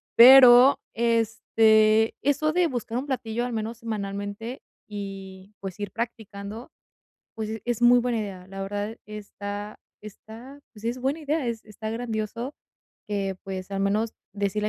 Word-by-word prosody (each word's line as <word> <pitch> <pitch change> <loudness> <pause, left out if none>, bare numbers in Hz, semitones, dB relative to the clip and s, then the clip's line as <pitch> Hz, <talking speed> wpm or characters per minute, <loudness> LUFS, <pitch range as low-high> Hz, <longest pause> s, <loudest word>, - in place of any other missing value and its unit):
pero, 250 +1 +9 0.2
este, 225 -1 +3
eso 285 +3 +2
de 355 +2 +2
buscar 245 -6 -3
un 260 - -2
platillo 240 -4 -2
al 245 - -4
menos 225 +1 -3
semanalmente 210 +2 -5 0.2
y 195 -1 -8
pues 195 0 -7
ir 205 -2 -4
practicando, 220 -1 -6 0.6
pues 220 0 -4
es 240 -1 -2
muy 245 +1 +7
buena 240 -1 -1
idea, 190 -4 -6
la 195 0 -7
verdad 205 +3 -4
está 205 0 -7 0.2
está 225 +6 -12
pues 215 -2 -15
es 235 +2 -1
buena 270 +5 -1
idea, 305 -1 -1
es 230 -2 -3
está 215 0 -7
grandioso 230 +3 -4 0.5
que 200 -2 -2
pues 190 -1 -6
al 195 - -2
menos 210 +3 0 0.2
decirle 205 +1 -1
220 Hz, 145 wpm, -25 LUFS, 205-240 Hz, 0.6 s, pero